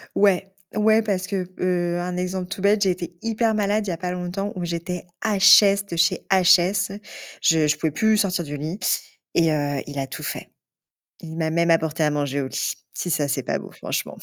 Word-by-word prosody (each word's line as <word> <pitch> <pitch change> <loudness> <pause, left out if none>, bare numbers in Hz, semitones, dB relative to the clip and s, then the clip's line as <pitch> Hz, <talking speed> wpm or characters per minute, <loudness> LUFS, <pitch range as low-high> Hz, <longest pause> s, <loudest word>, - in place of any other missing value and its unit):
Ouais! 195 -1 +2 0.2
Ouais, 215 +1 +4
parce 195 -4 -2
que, 195 -3 -2
heu, 175 -1 0
un 180 0 -4
exemple 180 0 -3
tout 195 - -6
bête, 205 +1 +3
j'ai 195 - +3
été 175 -1 -6
hyper 225 0 0
malade 210 0 0
il - - -2
y - - -1
a - - -5
pas 180 +1 -3
longtemps 180 +3 -4
où 180 -2 -3
j'étais 175 +1 -4 0.2
HS 200 -1 +6
de 170 - -4
chez 170 0 +1
HS. 190 +1 +3 0.4
Je 160 -2 +3
je 145 - +1
pouvais 160 - -1
plus 220 +8 +2
sortir 190 -4 0
du 145 -1 -6
lit 160 +7 -5 0.6
et, 165 -1 +4
heu, 145 -2 -1
il 145 -1 -5
a 135 - -2
tout 135 - -8
fait. - - -5 0.7
Il 160 -1 -8
m'a 160 -1 -1
même 170 +1 +2
apporté 160 -1 +1
à 150 - +3
manger 145 -1 -1
au - - -3
lit. - - -2 0.2
Si 175 - -3
ça, 155 -3 +1
c'est 135 -1 -1
pas - - -1
beau - - -10
franchement. - - -4
180 Hz, 215 wpm, -23 LUFS, 160-195 Hz, 0.7 s, HS